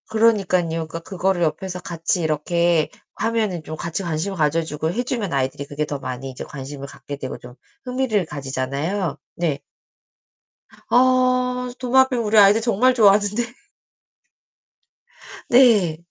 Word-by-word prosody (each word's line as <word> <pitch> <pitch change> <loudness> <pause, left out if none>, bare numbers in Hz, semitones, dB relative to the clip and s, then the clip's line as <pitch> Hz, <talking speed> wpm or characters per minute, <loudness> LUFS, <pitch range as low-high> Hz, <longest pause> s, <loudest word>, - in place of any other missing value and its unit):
그러니깐요. 185 -7 +2
그니까 165 +1 -6
그거를 190 +1 -1
옆에서 180 +4 -2
같이 170 0 -2
이렇게 165 +1 +1 0.3
하면은 215 -6 -1
좀 155 - -6
같이 170 +5 -4
관심을 170 +3 -2
가져 160 +1 +1
주고 160 0 -3
해 240 +7 -2
주면 230 -7 -3
아이들이 135 +1 -1
그게 145 +2 -3
더 145 -1 -5
많이 135 +1 -5
이제 130 - -7
관심을 140 0 -8
갖게 145 +1 -8
되고 130 -2 -6
좀 125 0 -13 0.3
흥미를 250 -6 0
가지잖아요? 140 +6 -3 0.2
네. 155 -5 -1 1.3
어 255 0 +3
도마뱀 255 -1 +3
우리 215 0 +1
아이들 205 +2 +7
정말 235 +3 +3
좋아하는데. 210 0 +4 2.1
네. 220 -10 +5
175 Hz, 300 characters per minute, -22 LUFS, 150-225 Hz, 2.1 s, 아이들